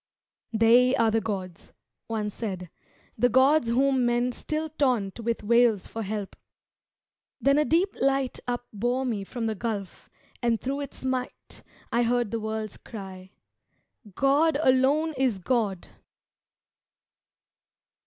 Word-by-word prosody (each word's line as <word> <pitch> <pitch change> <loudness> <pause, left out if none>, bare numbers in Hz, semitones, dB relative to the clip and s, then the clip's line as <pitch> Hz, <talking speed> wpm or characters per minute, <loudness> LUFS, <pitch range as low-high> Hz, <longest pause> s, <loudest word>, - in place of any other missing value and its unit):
"They 240 +3 +5
are 225 -1 +3
the 225 +1 +1
gods," 190 -5 -6 0.3
one 215 -2 -2
said 185 -6 -5 0.5
"the 245 +2 +4
gods 265 +3 +4
whom 260 +2 +2
men 240 +1 +1
Still 310 +5 -3
taunt 250 -10 0
with 230 -1 -2
wails 235 -2 +3
for 225 - -6
help." 205 -1 -4 1.0
Then 275 +1 +3
a 300 - +2
deep 350 +6 +1
light 270 -1 +1
Upbore 245 +1 -2
me 220 -6 -2
from 230 +3 -5
the 220 - 0
Gulf, 210 -2 -5 0.3
and 235 -2 +1
thro' 275 +2 -3
its 280 -2 -7
might 255 -1 -4 0.3
I 235 - +2
heard 240 -2 +1
the 230 - -1
worlds 220 -1 -4
cry, 190 -3 -10 0.9
"God 285 +3 +3
alone 275 +5 +3
is 255 -6 +1
God!" 200 -1 -1
240 Hz, 125 wpm, -26 LUFS, 215-265 Hz, 1.0 s, They